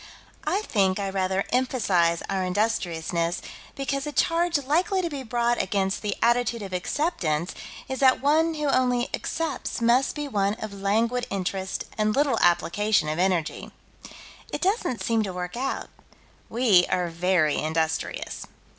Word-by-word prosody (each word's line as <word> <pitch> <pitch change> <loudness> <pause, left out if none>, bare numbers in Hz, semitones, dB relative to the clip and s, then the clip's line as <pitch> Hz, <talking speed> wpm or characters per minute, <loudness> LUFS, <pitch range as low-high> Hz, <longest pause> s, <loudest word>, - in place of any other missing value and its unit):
I 405 +3 +1
think 195 - +1
I 200 -1 -2
rather 190 0 0
emphasize 200 -10 +2
our 190 -1 -1
industriousness, 175 -4 -1 0.4
because 275 +1 -2
a - - -3
charge 335 +2 +2
likely 350 +8 +1
to 340 - -2
be 280 -2 -4
brought 240 -1 0
against 195 0 -1
the 205 -2 -2
attitude 235 -1 +2
of 190 -2 -7
Acceptance 180 - -1 0.3
is 265 - -4
that 260 -1 +5
one 315 +4 +2
who 300 -1 -2
only 250 -2 +2
accepts 320 -6 -3
must 240 +3 +3
be 295 -1 -3
one 200 -5 0
of 215 -2 -7
languid 225 +5 0
interest 190 -1 -3 0.2
and 215 0 +2
little 285 -1 +2
application 175 0 +2
of 155 +2 -2
energy. 180 -4 0 0.8
It - - -4
doesn't 370 - 0
seem 230 -1 +1
to 195 -3 -3
work 180 +1 -5
out: 265 +3 -3 0.6
we 220 -7 +4
are 180 -1 0
very 170 -2 +1
industrious. 160 0 -2
215 Hz, 145 wpm, -25 LUFS, 185-265 Hz, 0.8 s, that